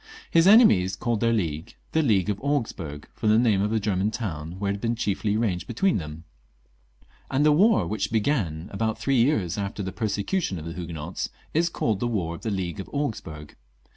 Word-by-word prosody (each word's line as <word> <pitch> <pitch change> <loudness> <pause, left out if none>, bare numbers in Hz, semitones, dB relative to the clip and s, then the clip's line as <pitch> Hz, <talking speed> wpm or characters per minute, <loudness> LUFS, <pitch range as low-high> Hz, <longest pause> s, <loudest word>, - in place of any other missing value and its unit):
His 165 +2 +5
enemies 105 - +6
called 115 +3 -1
their 115 +1 +2
league 80 -8 -2 0.2
the 160 - +2
League 105 - +2
of 100 - -5
Augsburg, 110 - -3
from 110 - -1
the 110 - +5
name 110 -5 +3
of 105 +1 0
a 110 - +2
German 100 -1 0
town, 85 -8 -5
where 100 0 -1
it - - 0
had 100 - -7
been 115 0 0
chiefly 105 -1 -1
arranged 105 -6 -1
be 120 - -6
tween 195 - +2
them; 75 -2 -7 1.1
and 140 +3 +2
the 150 - +6
war 205 +9 +4
which 110 +1 -2
began 105 - 0
about 110 +2 -1
three 130 +4 +1
years 110 - +1
after 100 0 -3
the 95 - -4
persecution 105 - -1
of 80 - -7
the 85 - -5
Huguenots, 85 -1 -5 0.2
is 170 +2 +2
caUed 110 - -1
the 120 - 0
War 95 -8 -1
of 85 - -9
the 110 - -3
League 95 -2 -3
of 95 - -7
Augsburg. 80 - -4
105 Hz, 205 wpm, -25 LUFS, 90-120 Hz, 1.1 s, enemies